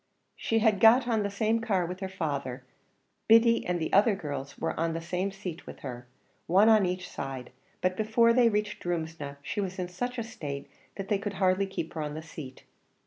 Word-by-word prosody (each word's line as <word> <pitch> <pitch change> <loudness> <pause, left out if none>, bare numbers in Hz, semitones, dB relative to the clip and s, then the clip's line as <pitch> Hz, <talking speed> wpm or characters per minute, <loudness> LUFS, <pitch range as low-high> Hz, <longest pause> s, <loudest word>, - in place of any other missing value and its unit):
She 225 - 0
had 220 -3 +3
got 235 +4 +6
on 225 -3 +2
the 200 - -1
same 220 +3 +1
car 195 -6 +1
with 180 +2 -6
her 190 -1 -4
father; 140 -8 -3 0.6
Biddy 230 +1 +6
and 175 -1 0
the 160 - -3
other 205 +2 +5
girl 145 -6 -5
were - - -1
on 165 0 0
the 165 - -2
same 180 +3 -2
seat 190 -4 -7
with - - -10
her, 125 -2 -7 0.4
one 195 +6 +5
on 215 -4 +5
each 180 0 -3
side; 135 -2 -6 0.3
but 185 0 +1
before 230 +2 +4
they 240 -1 +5
reached 210 -1 -2
Drumsna, 160 -4 -4
she 205 - -2
was 190 -1 -4
in 180 -1 -3
such 245 +8 -4
a 235 - -1
state, 145 -11 -6 0.3
that 195 -1 -5
they 205 - +2
could 205 0 -4
hardly 190 +1 +2
keep 180 -4 -5
her 160 - -3
on 150 0 -4
the 155 - -6
seat. 145 -5 -10
185 Hz, 210 wpm, -29 LUFS, 160-215 Hz, 0.6 s, got